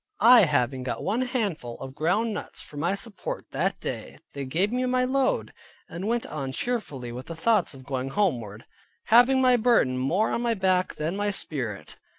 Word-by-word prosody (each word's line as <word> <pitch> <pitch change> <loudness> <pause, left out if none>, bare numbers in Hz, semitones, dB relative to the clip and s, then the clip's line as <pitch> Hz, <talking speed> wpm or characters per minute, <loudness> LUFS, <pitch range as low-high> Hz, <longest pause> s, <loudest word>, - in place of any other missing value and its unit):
I 240 -3 +9
having 135 -4 0
got 125 -1 -4
one 220 +6 0
handful 205 - -2
of 135 - -7
ground 195 +10 0
nuts, - - -6
for - - -12
my 170 +6 0
support 230 - -6
that - - -1
day, - - -5 0.2
they 140 -1 -4
gave 175 +10 0
me 250 +1 0
my 255 0 +2
load, 265 +1 0 0.3
and 170 +3 -7
I - - -2
went 235 +1 0
on 135 -3 -5
cheerfully 145 - -3
(with 125 +2 -8
the 165 - -6
thoughts 195 -2 +1
of 130 -1 -13
going 135 -1 -3
homeward), 120 - -1 0.5
having 260 +3 +6
my 250 -1 +5
burden 220 - +3
more 175 +12 +1
on - - -1
my 235 -1 +1
back 185 -2 +1
than 160 +4 -2
my 205 +1 0
spirit. 120 - -4
185 Hz, 190 wpm, -26 LUFS, -, 0.5 s, I